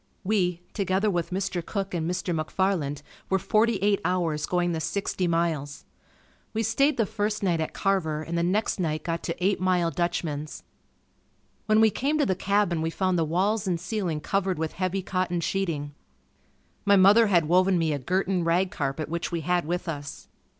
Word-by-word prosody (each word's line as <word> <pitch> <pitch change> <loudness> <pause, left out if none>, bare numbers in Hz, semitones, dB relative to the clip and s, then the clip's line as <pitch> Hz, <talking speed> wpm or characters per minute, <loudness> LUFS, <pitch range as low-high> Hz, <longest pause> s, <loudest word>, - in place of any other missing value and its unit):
We, 180 -4 0
together 200 +1 +1
with 175 -3 -1
Mr. 185 -1 -2
Cook 195 +1 -4
and 165 -1 -1
Mr. 180 0 -2
McFarland 155 -3 -1 0.3
were 190 - +3
forty 215 +4 +2
eight 205 0 +2
hours 170 -4 0
going 175 -1 +1
the 165 - -2
sixty 190 +1 -1
miles. 165 -4 -1 0.7
We 225 - +1
stayed 275 +7 +2
the 225 - +2
first 210 0 -2
night 170 -4 +1
at 160 - -4
Carver 160 -6 0
and 170 +2 -4
the 170 - +1
next 190 +5 0
night 155 -3 -1
got 170 0 -2
to 170 - -3
"Eight 200 0 +2
Mile 180 -2 +1
Dutchman's." 160 -4 -3 1.0
When 215 0 +4
we 220 -1 +5
came 285 +7 0
to 295 - +2
the 190 - +1
cabin 190 -3 +1
we 160 - 0
found 185 +2 0
the - - +3
walls 195 +6 0
and 175 -2 0
ceiling 175 -4 -2
covered 190 +2 0
with 160 0 -2
heavy 185 +1 -2
cotton 185 -2 -1
sheeting. 165 -5 -2 0.9
My 200 - +5
mother 200 +4 +6
had 175 -5 +3
woven 185 +2 +4
me 160 -2 +1
a 145 - -2
Gerton 185 +5 0
rag 175 +3 +1
carpet 140 +1 -3
which 170 +1 -3
we 170 -1 -2
had 175 +1 0
with 175 +3 -3
us. 145 -3 -6
180 Hz, 185 wpm, -26 LUFS, 165-195 Hz, 1.0 s, mother